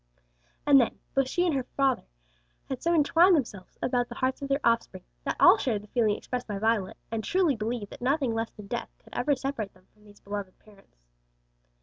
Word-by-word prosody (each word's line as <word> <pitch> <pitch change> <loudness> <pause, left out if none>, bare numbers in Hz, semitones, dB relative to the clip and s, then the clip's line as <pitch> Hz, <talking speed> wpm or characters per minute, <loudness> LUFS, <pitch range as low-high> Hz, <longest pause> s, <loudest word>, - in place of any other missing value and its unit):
And 280 -2 +7
then 235 - -1 0.2
both 270 -1 +1
she 355 +4 +1
and 335 -5 +1
their 265 - +1 0.2
father 270 -2 +1 0.6
had 265 - -4
so 340 - +1
entwined 335 +4 +5
themselves 210 - -4
about 245 -1 0
the 240 - -7
hearts 260 +3 -1
of 280 - -3
their 275 +1 +2
offspring, 230 -5 +1 0.2
that - - -1
all - - +7
shared 215 -6 -1
the - - -14
feeling 220 -3 +2
expressed 250 -1 -5
by 205 -2 -3
Violet, 215 -2 0
and 225 -1 -2
truly 355 - +2
believed 220 -1 -4
that - - -11
nothing 265 -1 +1
less 225 0 -2
than 210 - -12
death 235 +3 -4
could - - -20
ever 285 +3 +1
separate 255 -7 -4
them 185 0 -23
from 210 - -25
these 205 -1 -17
beloved 200 -2 -6
parents. 200 - -22
240 Hz, 210 wpm, -28 LUFS, 210-275 Hz, 0.6 s, And